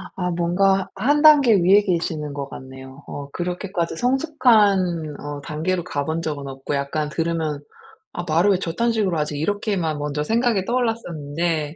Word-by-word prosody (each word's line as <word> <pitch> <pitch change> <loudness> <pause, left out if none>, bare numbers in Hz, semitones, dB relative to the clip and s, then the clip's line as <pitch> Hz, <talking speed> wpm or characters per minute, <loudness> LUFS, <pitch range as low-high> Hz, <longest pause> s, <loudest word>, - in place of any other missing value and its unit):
아 180 -1 -2
뭔가 185 +3 +1
1 280 +9 +2
단계 295 -7 +7
위에 195 +2 +5
계시는 165 -5 -2
것 140 -1 -5
같네요. 130 +1 -11
어 140 0 -7
그렇게까지 175 -1 -3
성숙한 210 - +2
어 145 0 -6
단계로 165 +5 -2
가 145 -5 -3
본 160 +1 -2
적은 145 -4 -4
없고 135 +2 -4
약간 145 +2 -2
들으면 160 -3 -2 0.5
'아 175 - -4
말을 170 +6 +3
왜 190 - +2
저딴 230 +8 -1
식으로 195 -7 0
하지?' 150 -1 -2
이렇게만 180 -2 -1
먼저 150 0 -2
생각이 225 -1 +1
떠올랐었는데. 170 - -2
170 Hz, 325 characters per minute, -22 LUFS, 150-200 Hz, 0.5 s, 단계